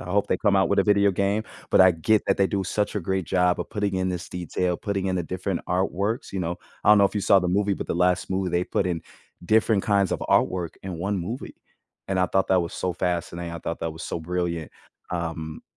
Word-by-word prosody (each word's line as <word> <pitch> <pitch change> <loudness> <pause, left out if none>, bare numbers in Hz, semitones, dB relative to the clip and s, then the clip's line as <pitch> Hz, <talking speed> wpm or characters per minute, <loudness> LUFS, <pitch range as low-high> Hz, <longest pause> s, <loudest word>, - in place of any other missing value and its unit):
I - - -8
hope 100 +3 +1
they 90 - +1
come 100 -2 +3
out 95 - +3
with 100 - +2
a - - +4
video 100 -1 +4
game, 100 +3 0 0.3
but - - +5
I 95 - +7
get 105 +7 +2
that 100 - +2
they 95 - +4
do 100 -2 -1
such 105 +3 -1
a - - 0
great 95 0 -2
job 90 -1 +2
of - - -5
putting 100 -2 -1
in 95 0 0
this 90 -2 -4
detail, 90 0 -2
putting 100 -2 -2
in 95 -1 0
the 90 - 0
different 90 +2 -3
artworks, 95 +5 -1
you 95 - -2
know? 85 0 -2 0.3
I - - +2
don't 105 - +8
know 100 - +6
if 100 - 0
you 105 - 0
saw 95 - +5
the 90 -1 -1
movie, 100 +2 +1
but - - -5
the - - -2
last 90 +1 +1
movie, 95 -1 -1
they 90 +1 +1
put - - -1
in 85 -3 -2 0.4
different 110 0 +3
kinds 100 -3 +2
of - - -2
artwork 90 -3 +1
in 90 -4 -6
1 100 +3 -1
movie. 110 +9 -5 0.5
And 95 -1 +1
I 90 - +3
thought 95 +2 +1
that 95 -1 +4
was 85 - -6
so 90 -1 -2
fascinating, 85 -1 -3
I 85 - -5
thought 85 - -5
that 80 -1 -2
was 80 - -9
so 85 - -4
brilliant. 85 -2 -3 0.4
Um 80 -2 -4
95 Hz, 255 wpm, -25 LUFS, 85-100 Hz, 0.5 s, don't